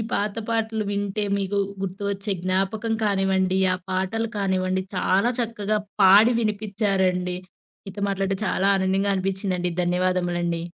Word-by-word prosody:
పాత 205 Hz, +1 st, -1 dB
పాటలు 225 Hz, -1 st, 0 dB
వింటే 205 Hz, +1 st, -2 dB
మీకు 200 Hz, 0 st, -1 dB, 0.2 s
గుర్తువచ్చే 200 Hz, +1 st, -3 dB
జ్ఞాపకం 195 Hz, +5 st, -1 dB
కానివ్వండి, 190 Hz, -2 st, +1 dB, 0.2 s
ఆ -, -, -2 dB
పాటలు 190 Hz, +5 st, -1 dB
కానివ్వండి 190 Hz, -1 st, 0 dB
చాలా 195 Hz, +5 st, +2 dB
చక్కగా 215 Hz, -2 st, -1 dB, 0.2 s
పాడి 205 Hz, +5 st, +7 dB
వినిపించారండి. 195 Hz, -4 st, 0 dB, 0.5 s
మీతో 200 Hz, +1 st, -7 dB
మాట్లాడడం 195 Hz, -1 st, -1 dB
చాలా 190 Hz, -, +1 dB
ఆనందంగా 195 Hz, +1 st, +1 dB
అనిపించిందండి. 190 Hz, -2 st, -1 dB
ధన్యవాదములండి. 175 Hz, -1 st, 0 dB
195 Hz, 110 wpm, -24 LUFS, 185-205 Hz, 0.5 s, పాడి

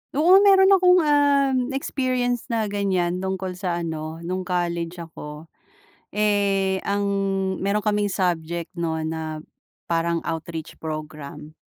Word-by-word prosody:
Oo, 355 Hz, +6 st, +6 dB
meron 390 Hz, -1 st, +6 dB
akong, 365 Hz, -2 st, +6 dB
um, 285 Hz, -3 st, +3 dB, 0.2 s
experience 255 Hz, -3 st, -1 dB
na 230 Hz, -3 st, 0 dB
ganiyan 185 Hz, -3 st, 0 dB
tungkol 190 Hz, 0 st, -3 dB
sa 175 Hz, -2 st, -2 dB
ano, 160 Hz, 0 st, -5 dB
nung 185 Hz, +2 st, -3 dB
college 170 Hz, -1 st, -1 dB
ako. 155 Hz, -1 st, -10 dB, 0.6 s
Eh, 200 Hz, -2 st, +1 dB
ang 200 Hz, 0 st, 0 dB, 0.6 s
meron 200 Hz, +2 st, +1 dB
kaming 210 Hz, -1 st, +1 dB
subject 170 Hz, -3 st, -1 dB
'no 165 Hz, -2 st, -2 dB
na 160 Hz, -1 st, -4 dB, 0.5 s
parang 170 Hz, 0 st, 0 dB
outreach 165 Hz, -1 st, -5 dB
program. 155 Hz, -1 st, -7 dB
185 Hz, 120 wpm, -23 LUFS, 165-225 Hz, 0.6 s, Oo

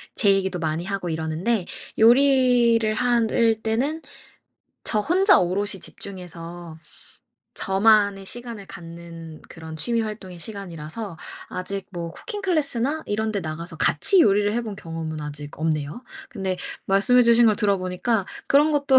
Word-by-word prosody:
제 200 Hz, -2 st, +4 dB
얘기도 190 Hz, -2 st, 0 dB
많이 160 Hz, +1 st, -2 dB
하고 195 Hz, -2 st, -3 dB
이러는데 165 Hz, +6 st, -1 dB, 0.3 s
요리를 240 Hz, -2 st, +5 dB
한 240 Hz, -2 st, +2 dB
을 225 Hz, -2 st, +2 dB
때는 265 Hz, +9 st, -1 dB, 0.8 s
저 215 Hz, -, +2 dB
혼자 375 Hz, -, +4 dB
오롯이 195 Hz, +2 st, -1 dB
집중해서 175 Hz, -4 st, -8 dB, 0.8 s
저만의 200 Hz, 0 st, +3 dB
시간을 235 Hz, -3 st, -6 dB
갖는 165 Hz, -2 st, -10 dB
그런 160 Hz, -1 st, -9 dB
취미 230 Hz, +10 st, 0 dB
활동의 205 Hz, -5 st, -7 dB
시간이라서 180 Hz, -1 st, -6 dB, 0.3 s
아직 195 Hz, +2 st, -4 dB
뭐 170 Hz, -2 st, -5 dB
쿠킹 415 Hz, -, -6 dB
클래스나 305 Hz, -4 st, 0 dB
이런 220 Hz, +1 st, -1 dB
데 200 Hz, -, -1 dB
나가서 165 Hz, +1 st, -6 dB
같이 385 Hz, -3 st, +3 dB
요리를 205 Hz, -5 st, +3 dB
해 235 Hz, -, 0 dB
본 210 Hz, -3 st, -6 dB
경험은 165 Hz, -2 st, -6 dB
아직 145 Hz, 0 st, -7 dB
없네요. 155 Hz, -, -2 dB, 0.3 s
근데 190 Hz, -, -3 dB, 0.3 s
말씀해 225 Hz, +6 st, +5 dB
주신 235 Hz, 0 st, +6 dB
걸 215 Hz, -2 st, +4 dB
들어보니까 195 Hz, +2 st, 0 dB, 0.2 s
그런 295 Hz, +3 st, +4 dB
것도 280 Hz, -2 st, +4 dB
200 Hz, 305 characters per minute, -23 LUFS, 170-235 Hz, 0.8 s, 주신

